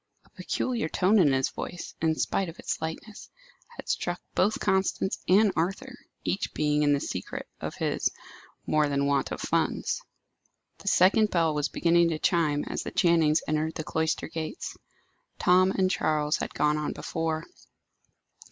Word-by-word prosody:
A -, -, -26 dB
peculiar 240 Hz, -10 st, -2 dB
tone 200 Hz, +6 st, +3 dB
in 155 Hz, -7 st, +5 dB
his 135 Hz, 0 st, +1 dB
voice, 175 Hz, -, -7 dB
in 160 Hz, -1 st, +2 dB
spite 190 Hz, +3 st, -1 dB
of 165 Hz, -, -11 dB
its -, -, -4 dB
lightness, 160 Hz, +7 st, -6 dB, 0.5 s
had -, -, -9 dB
struck 175 Hz, 0 st, -1 dB
both 205 Hz, +4 st, +2 dB
Constance 190 Hz, 0 st, 0 dB
and 200 Hz, +2 st, +5 dB
Arthur, 190 Hz, +10 st, -2 dB, 0.3 s
each 195 Hz, -, -2 dB
being 150 Hz, 0 st, +1 dB
in 145 Hz, -1 st, +3 dB
the 140 Hz, -, +2 dB
secret 90 Hz, -8 st, -5 dB
of -, -, -5 dB
his -, -, 0 dB, 0.6 s
more 150 Hz, -1 st, +2 dB
than 140 Hz, 0 st, +1 dB
want 140 Hz, -1 st, +1 dB
of -, -, -4 dB
funds. -, -, -1 dB, 0.8 s
The -, -, -13 dB
second 210 Hz, +4 st, +4 dB
bell 165 Hz, -4 st, +2 dB
was 150 Hz, -1 st, -1 dB
beginning 170 Hz, 0 st, +3 dB
to 160 Hz, -, -1 dB
chime 155 Hz, -3 st, +1 dB
as -, -, -3 dB
the -, -, -5 dB
Channings 165 Hz, -3 st, +3 dB
entered 155 Hz, +1 st, -1 dB
the 160 Hz, -, -3 dB
cloister 160 Hz, +1 st, -1 dB
gates. 160 Hz, -, -5 dB, 0.6 s
Tom 185 Hz, +1 st, +4 dB
and 190 Hz, -1 st, +1 dB
Charles 150 Hz, -6 st, +1 dB
had -, -, -5 dB
gone 150 Hz, 0 st, +2 dB
on 150 Hz, -, -2 dB
before. 160 Hz, -1 st, -3 dB
165 Hz, 160 wpm, -27 LUFS, 150-185 Hz, 0.8 s, in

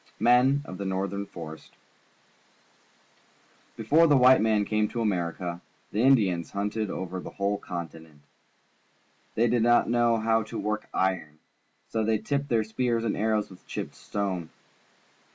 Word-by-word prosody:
The -, -, -8 dB
Men 130 Hz, +4 st, +4 dB
of 95 Hz, 0 st, -8 dB
the 100 Hz, -, -3 dB
Northern 100 Hz, +1 st, -2 dB
Forest. 80 Hz, -3 st, -10 dB, 1.4 s
— -, -, -34 dB
Before 150 Hz, +10 st, +4 dB
the 145 Hz, -3 st, +5 dB
white 130 Hz, -1 st, +6 dB
man 110 Hz, -2 st, +2 dB
came 105 Hz, 0 st, +1 dB
to 120 Hz, -, -5 dB
America, 90 Hz, -3 st, -2 dB, 0.3 s
the 105 Hz, -, 0 dB
Indians 105 Hz, -10 st, +3 dB
hunted 105 Hz, +1 st, -2 dB
over 95 Hz, 0 st, -4 dB
the -, -, -7 dB
whole 100 Hz, 0 st, -2 dB
continent. 80 Hz, -5 st, -8 dB, 1.1 s
They 115 Hz, +2 st, +3 dB
did 120 Hz, 0 st, +2 dB
not 120 Hz, 0 st, +3 dB
know 120 Hz, -1 st, +3 dB
how 115 Hz, 0 st, +2 dB
to 110 Hz, -, -7 dB
work 105 Hz, +1 st, -3 dB
iron, 95 Hz, -4 st, 0 dB
and 75 Hz, +1 st, -28 dB, 0.5 s
so 110 Hz, -, -1 dB
they 110 Hz, 0 st, +2 dB
tipped 140 Hz, +5 st, -2 dB
their 115 Hz, -2 st, +2 dB
spears 115 Hz, +1 st, -1 dB
and 110 Hz, -, 0 dB
arrows 110 Hz, -1 st, 0 dB
with 90 Hz, -, -16 dB
chipped -, -, -5 dB
stone. 95 Hz, -5 st, -4 dB
105 Hz, 155 wpm, -27 LUFS, 95-115 Hz, 1.4 s, white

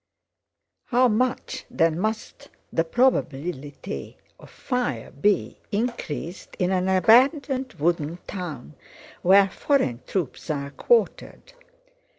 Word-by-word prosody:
How 250 Hz, 0 st, +4 dB
much 255 Hz, +3 st, -1 dB
then 165 Hz, 0 st, +1 dB
must 215 Hz, +3 st, -4 dB, 0.2 s
the 165 Hz, -, +2 dB
probability 160 Hz, -, -1 dB, 0.2 s
of -, -, -14 dB
fire 245 Hz, -, -3 dB
be 140 Hz, -, 0 dB
increased 200 Hz, -6 st, -4 dB
in 180 Hz, 0 st, +1 dB
an 185 Hz, 0 st, +1 dB
abandoned, 260 Hz, -, +4 dB
wooden 170 Hz, -1 st, -1 dB
town 165 Hz, -, -6 dB, 0.5 s
where 195 Hz, +2 st, +6 dB
foreign 185 Hz, -, 0 dB
troops 175 Hz, -7 st, -3 dB
are 140 Hz, -2 st, -2 dB
quartered. 480 Hz, -, 0 dB
190 Hz, 100 wpm, -24 LUFS, 155-245 Hz, 0.5 s, where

